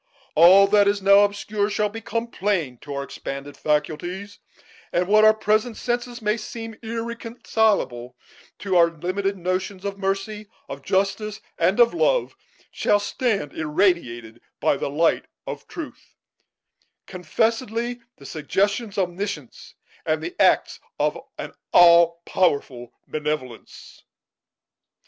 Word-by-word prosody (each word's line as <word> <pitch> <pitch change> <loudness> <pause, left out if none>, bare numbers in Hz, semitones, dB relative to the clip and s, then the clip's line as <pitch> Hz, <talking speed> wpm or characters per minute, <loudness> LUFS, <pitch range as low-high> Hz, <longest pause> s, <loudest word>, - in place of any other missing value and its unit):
All 180 +5 +8
that 205 0 +4
is 200 0 +2
now 200 +1 +6
obscure 205 0 0
shall 210 0 0
become 225 +2 -4
plain 185 - -2
to 145 - -7
our 140 - -3
expanded 140 +1 -7
faculties; 175 +7 -2 0.5
and 175 +1 0
what 215 +2 +5
to 215 - +7
our 215 - +7
present 220 +2 0
senses 240 -1 -3
may 210 +2 +1
seem 225 +1 -7
irreconcilable 220 - -2 0.4
to 190 -2 -2
our 170 -1 +6
limited 185 +5 -3
notions 185 +2 -3
of 200 0 -4
mercy, 195 +2 -3 0.2
of 140 0 -7
justice, 200 +5 -1 0.2
and 185 +6 +2
of 235 -1 +5
love, - - +1 0.4
shall 205 - +2
stand 205 - -2
irradiated 150 - -1 0.2
by - - +2
the - - -3
light 160 +4 +1 0.2
of - - -7
truth, 325 -3 -9 0.9
confessedly 230 +6 -2 0.2
the - - -15
suggestions 200 - -1
of 190 -2 +2
Omniscience, 195 +3 -7 0.3
and - - -1
the 350 +1 -5
acts - - +3 0.2
of - - +1 0.2
an - - -7 0.2
All 170 -1 +6
powerful 135 -8 0 0.2
Benevolence." 150 -6 -5
200 Hz, 125 wpm, -23 LUFS, 170-215 Hz, 0.9 s, All